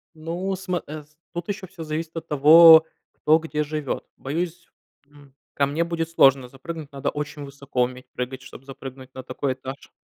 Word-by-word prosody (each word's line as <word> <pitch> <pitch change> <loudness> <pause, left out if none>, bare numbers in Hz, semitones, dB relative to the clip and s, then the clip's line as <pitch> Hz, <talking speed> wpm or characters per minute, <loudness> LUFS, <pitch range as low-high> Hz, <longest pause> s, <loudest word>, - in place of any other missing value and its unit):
Ну, 175 +5 -3
сма 185 -2 -3
эс 150 0 -10 0.2
тут 175 +1 -6
ещё 200 -2 -4
всё 180 -4 -10
зависит 160 +2 -4
от 165 0 -5
того, 160 +3 +9 0.3
кто 155 +1 +3
где 155 -2 -3
живёт. 150 -2 -4
Боюсь, 170 +4 -4 0.4
м, 145 -2 -19 0.2
ко 140 - +2
мне 155 +4 0
будет 165 -1 -2
сложно 135 -5 +4
запрыгнуть. 150 +3 -8
Надо 140 +1 -2
очень 145 0 -5
высоко 140 -2 -3
уметь 125 +1 -4
прыгать, 125 +1 -5
чтоб 125 - -13
запрыгнуть 135 -1 -10
на 130 - -7
такой 130 +1 -3
этаж, 130 +2 -9
150 Hz, 175 wpm, -24 LUFS, 135-165 Hz, 0.4 s, того